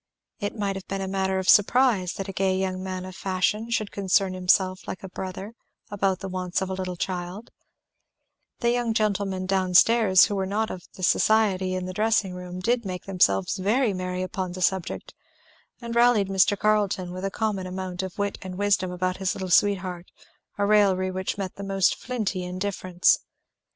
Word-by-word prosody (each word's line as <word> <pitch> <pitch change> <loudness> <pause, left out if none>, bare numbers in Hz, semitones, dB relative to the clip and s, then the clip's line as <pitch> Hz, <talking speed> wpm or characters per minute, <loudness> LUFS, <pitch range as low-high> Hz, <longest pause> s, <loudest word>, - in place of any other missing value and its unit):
It 205 +2 -4
might 200 -2 -1
have 190 - -8
been 195 -1 -3
matter 190 -1 0
of 190 0 -3
surprise 205 -4 +4
that 195 - -5
a 195 - -6
gay 190 0 +1
young 185 -1 -2
man 185 -1 -5
of 185 -1 -9
fashion 195 +4 -1
should 215 -3 -1
concern 195 -1 +1
himself 185 0 +1
like 185 - -6
a 190 - -7
brother 190 +3 -6 0.4
about 195 -2 0
the 195 - -4
wants 180 -1 -2
of 190 0 -3
a - - -1
little 185 -1 -4
child; 180 +4 -5 1.1
the 235 -1 +3
young 240 -2 0
gentlemen 200 -3 0
down 185 -1 0
stairs 215 -2 +6
who - - -3
were 190 -1 -1
not 215 +3 -1
of 180 - -8
the 185 - -9
society 190 -2 +2
in 185 0 -3
the 185 - -5
dressing 215 -2 +1
room 180 0 -7
did 235 +4 +1
make 185 -3 -6
themselves 100 - +2
very 215 +4 +1
merry 185 0 -3
upon 185 -2 -4
the 185 - -7
subject, 185 -1 -1 0.7
and 235 -1 -5
rallied 235 -5 +4
Mr. 195 +1 +3
Carleton 205 -4 +1
with 185 +1 -6
the 195 - -1
common 200 -3 -2
amount 185 0 -4
of 190 -2 -6
wit 200 -1 -2
and 185 -1 -7
wisdom 200 -2 +1
about 185 +1 -2
his 190 0 -1
little 185 -2 -5
sweetheart; 185 -2 +1 0.5
a 205 - +1
raillery 195 -3 +3
which 185 +1 -3
met 190 -2 -5
the 200 - -6
most 195 -1 +2
flinty 215 -7 -3
indifference. 185 -1 +1
190 Hz, 185 wpm, -25 LUFS, 185-205 Hz, 1.1 s, stairs